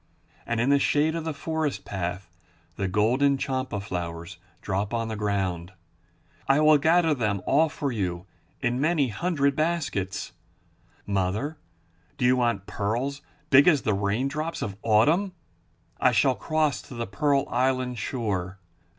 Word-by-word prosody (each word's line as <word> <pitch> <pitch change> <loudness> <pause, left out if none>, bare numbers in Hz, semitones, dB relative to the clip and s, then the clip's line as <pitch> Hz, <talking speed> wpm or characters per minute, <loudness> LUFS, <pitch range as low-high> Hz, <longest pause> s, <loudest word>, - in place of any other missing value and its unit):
And 115 -1 -1
in 125 +4 +2
the 140 - +5
shade 150 +3 +2
of 165 -1 -4
the 160 - -1
forest 150 -9 -2
path 90 -1 -4 0.5
the 100 - -2
golden 125 +9 +2
champa 130 -5 -2
flowers 85 -2 -5 0.2
drop 100 +3 -2
on 115 -1 -2
the 110 - -3
ground. 95 -4 -2 0.7
I 135 +2 +4
will 155 -1 +6
gather 160 +2 +3
them 105 -8 -1
all 155 +3 +3
for 145 -2 -3
you 90 -5 -3 0.4
in 120 +2 0
many 155 -4 +2
hundred 140 +1 0
baskets. 155 - -2 0.7
Mother, 100 +10 -1 0.6
do 125 - 0
you 125 +1 +5
want 120 -6 0
pearls 120 +9 -2 0.3
big 140 +2 +7
as 150 -6 +4
the 110 - +1
raindrops 130 +11 -1
of 100 -2 -4
autumn? 155 - +3 0.7
I - - +4
shall 135 - +4
cross 155 +2 0
to 130 - -12
the 115 0 -3
pearl 140 +7 +1
island 130 -1 0
shore. 100 -5 -3
125 Hz, 145 wpm, -26 LUFS, 100-145 Hz, 0.7 s, big